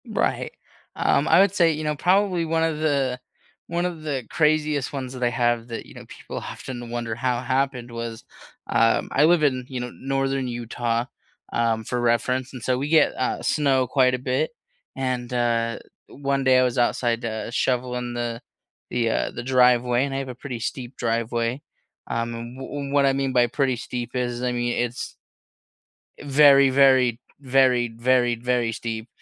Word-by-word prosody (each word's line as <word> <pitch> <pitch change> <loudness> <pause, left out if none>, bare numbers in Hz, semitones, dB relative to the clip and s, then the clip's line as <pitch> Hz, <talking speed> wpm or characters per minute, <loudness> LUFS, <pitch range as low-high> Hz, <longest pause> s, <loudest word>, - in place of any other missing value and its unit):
Right, - - -1 0.4
um, 140 +3 +2
I - - +6
would 195 0 +4
say, 170 -5 +4
you 155 0 -4
know, 150 0 -1
probably 185 +2 +2
1 165 0 +1
of 160 -2 -1
the 140 -5 0 0.5
1 170 +1 -1
of 175 -3 -4
the 140 -4 -3
craziest 150 -3 +1
ones 130 -2 -5
that 125 -1 -5
I 120 - +3
have 120 -1 0
that, 115 -1 -6
you - - -14
know, - - -11
people - - -9
often 120 -2 -7
wonder 120 -1 -3
how 125 +1 -1
it - - -7
happened 130 -2 -1
was, 115 0 -6 0.4
um, 115 0 +2
I 145 - +4
live 165 0 +4
in, 130 -3 +1
you 130 -2 -4
know, 125 0 -5
northern 135 -1 -1
Utah, 120 0 -2 0.5
um, 115 -1 0
for 125 +2 -2
reference, 125 +2 0
and 130 - -8
so, 125 +2 0
we 140 +3 -3
get, 160 0 +4
uh, - - -2
snow 135 -4 +2
quite 130 0 +3
a 130 - -1
bit, 130 +4 -1 0.5
and, 125 -2 -2
uh, 115 -1 0 0.3
1 140 -1 -2
day 130 -1 +5
I - - +4
was 125 0 0
outside, 120 -1 +1
uh, 110 -1 -4
shoveling 125 0 -1
the 120 0 -3 0.5
the, 120 -2 +1
uh, - - 0
the 120 - -6
driveway, 125 -1 +3
and 140 - -5
I - - -2
have 135 -1 -3
a 125 - -6
pretty 125 -1 -6
steep 120 +2 -5
driveway, 115 +2 -1 0.5
um, 115 0 -2
and 120 +2 -8
wh - - -6 0.2
and 140 0 -5
what 140 -1 +4
I 135 - +3
mean 135 0 -1
by 120 -1 +4
pretty 130 0 0
steep 120 0 -5
is, 120 -1 -2
I 125 - 0
mean, 120 0 -1
it's, 120 0 -3 1.0
eh, - - -11
very, 140 -1 +6
very, 130 -3 +4 0.2
very, 130 -2 +3
very, 120 0 +2
very 120 -1 0
steep 115 0 -5
125 Hz, 185 wpm, -24 LUFS, 120-135 Hz, 1.0 s, I